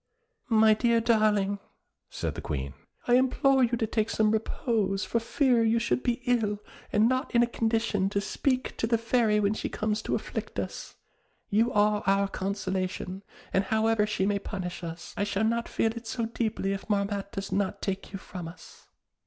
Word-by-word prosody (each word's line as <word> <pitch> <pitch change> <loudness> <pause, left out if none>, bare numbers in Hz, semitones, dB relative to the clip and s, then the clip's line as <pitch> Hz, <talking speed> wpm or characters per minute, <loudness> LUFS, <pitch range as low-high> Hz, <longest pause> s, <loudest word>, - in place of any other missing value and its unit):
"My 220 -1 +6
dear 235 +1 +3
darling," 215 -3 +2 0.5
said - - -3
the - - -6
Queen, 70 -2 -4 0.3
"I 240 - +4
implore 265 +1 +3
you 240 0 +2
to 225 - 0
take 220 0 0
some 215 -1 +2
repose 215 -2 0
for 230 - 0
fear 245 0 +2
you 225 +1 +3
should 235 +2 0
be 245 0 -1
ill 225 -4 +1 0.3
and 215 +2 +4
not 255 +1 -1
in 235 - +6
a - - +5
condition 225 -4 0
to 200 - 0
speak 255 +6 -1
to 225 - 0
the 230 0 +3
Fairy 225 -2 +2
when 205 0 +2
she - - -3
comes 215 0 -1
to - - -1
afflict - - -5
us; - - -5 0.6
you 225 +4 +3
are 210 0 +3
our 195 0 +3
consolation, 190 -1 -3 0.3
and 190 +1 +2
however 220 0 +2
she 205 -2 0
may 200 0 +1
punish 185 -3 -5
us, 170 0 -7
I - - 0
shall 200 +1 0
not 235 +1 0
feel 225 - +1
it 230 0 -8
so 230 0 -2
deeply 220 -3 -1
if 195 +2 -7
Marmotte 200 -1 -1
does 195 0 -4
not 200 0 0
take 195 -1 -4
you 195 - -4
from 180 -3 -8
us." 170 +2 -13
215 Hz, 185 wpm, -28 LUFS, 200-230 Hz, 0.6 s, My